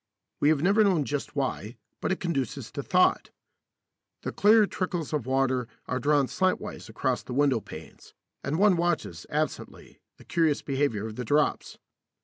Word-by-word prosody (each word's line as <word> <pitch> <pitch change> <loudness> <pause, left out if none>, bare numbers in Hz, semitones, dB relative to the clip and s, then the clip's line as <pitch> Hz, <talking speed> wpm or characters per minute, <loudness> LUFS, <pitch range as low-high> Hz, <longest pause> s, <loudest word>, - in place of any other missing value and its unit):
We 145 - +4
have 155 -1 +2
never 200 +4 +4
known 180 -8 +2
just 145 +1 -4
why, 130 -5 -3 0.2
but - - -1
it 190 - -1
conduces 140 - -3
to - - -4
thought. - - +2 0.9
The - - -3
clear 215 +1 +5
trickles 180 -6 -3
of 140 -5 -2
water 130 -2 +1 0.2
are 130 - -2
drawn 145 +1 +3
slantwise 185 +7 -2
across - - -1
the 125 - -7
window 140 -4 +3
panes, - - -12 0.3
and 140 +4 -1
one 200 -1 +4
watches, 170 - -2
absently, 155 +1 -4 0.2
the - - -17
curious 160 -4 +1
behaviour 135 -7 -1
of 110 -1 -7
the 125 - -3
drops. 145 +5 0
145 Hz, 160 wpm, -27 LUFS, 130-175 Hz, 0.9 s, clear